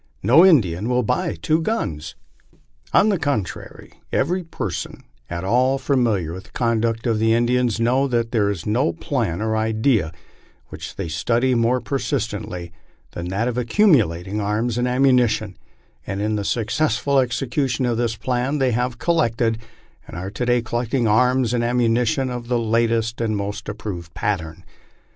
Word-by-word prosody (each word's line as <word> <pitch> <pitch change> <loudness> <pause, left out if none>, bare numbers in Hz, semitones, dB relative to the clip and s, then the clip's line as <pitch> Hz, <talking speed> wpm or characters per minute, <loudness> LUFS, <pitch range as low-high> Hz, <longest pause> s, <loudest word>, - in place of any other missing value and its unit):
No 135 - +6
Indian 110 - +3
will 125 0 +2
buy 175 - 0
IAVO 160 +1 0
guns." 80 - -3 0.8
On 215 - +4
the 195 -5 +1
contrary, 140 - -4 0.2
every 180 +7 0
person 165 - -5 0.3
at 85 0 -4
all 125 +7 +2
familiar 115 - 0
with 95 +2 -8
the - - -18
conduct 115 -1 0
of 115 -3 +1
the 110 0 +3
In 120 +1 +2
dians 125 -2 +1
knows 130 +4 +2
that 115 -2 0
there 105 -4 +2
is 95 -5 -4
no 105 -4 +1
plan 85 +3 -2
or 110 0 0
idea 110 - +1 0.6
which - - -8
they - - -4
study 115 +11 +1
more 120 +1 +2
persistently 110 - -3 0.4
than 85 0 -6
that 100 +6 -1
of 125 0 -1
accumulating 110 - +2
arms 110 +4 -1
and 125 - +1
ammunition, 125 -6 +2 0.5
and 100 - -3
in 105 +1 0
the 105 - -2
successful 125 +5 0
execu 130 +2 0
tion 130 +2 -1
of 120 -2 0
this 115 -1 0
plan 125 +5 -1
they 130 -3 +2
have 125 +1 -1
collected, 115 -9 +1 0.5
and - - -8
are 95 +2 -5
to 125 +3 -3
day 120 -1 +2
collecting 120 +1 -1
arms 125 +2 +3
and 120 -1 +1
am 120 +1 0
munition 120 +2 +1
of 120 -1 -6
the 120 0 +1
latest 115 0 0
and 110 -2 0
most 105 +2 -4
approved 100 -5 -6
pattern. 85 -7 -3
115 Hz, 165 wpm, -21 LUFS, 105-125 Hz, 0.8 s, No